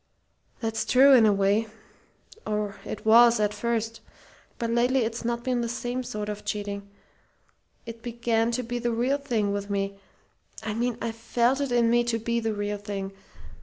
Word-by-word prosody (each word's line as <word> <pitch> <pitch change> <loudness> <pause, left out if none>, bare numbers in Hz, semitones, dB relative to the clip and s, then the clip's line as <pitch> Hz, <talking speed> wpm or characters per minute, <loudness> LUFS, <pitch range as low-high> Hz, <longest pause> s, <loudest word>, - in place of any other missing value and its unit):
That's 225 -1 -1
true, 265 +5 +6
in 230 -4 +7
a - - +5
way 200 +3 +2 0.8
or 210 -1 -2
it - - -6
was 235 +1 +7
at 210 0 +1
first. 225 +1 -2 0.6
But 230 -1 -2
lately 245 +3 +2
it's 230 +1 -2
not 235 0 -2
been 250 -1 0
the 235 - -2
same 245 +1 -3
sort 210 -4 -5
of 210 0 -5
cheating. 200 -1 -4 1.0
It 230 0 -8
began 235 -1 0
to 250 +1 -1
be 240 +1 -3
the 240 0 -1
real 250 +5 +1
thing 230 -8 -1
with 200 0 -4
me. 195 0 -2 0.6
I 215 -1 -2
mean 235 +1 -1
I 230 - -1
felt 235 +4 0
it 280 -3 -2
in 235 -1 +3
me 240 0 +4
to 235 -1 0
be 235 +1 -1
the 225 -2 -2
real 205 0 -3
thing. 200 -1 -5
230 Hz, 180 wpm, -26 LUFS, 210-240 Hz, 1.0 s, in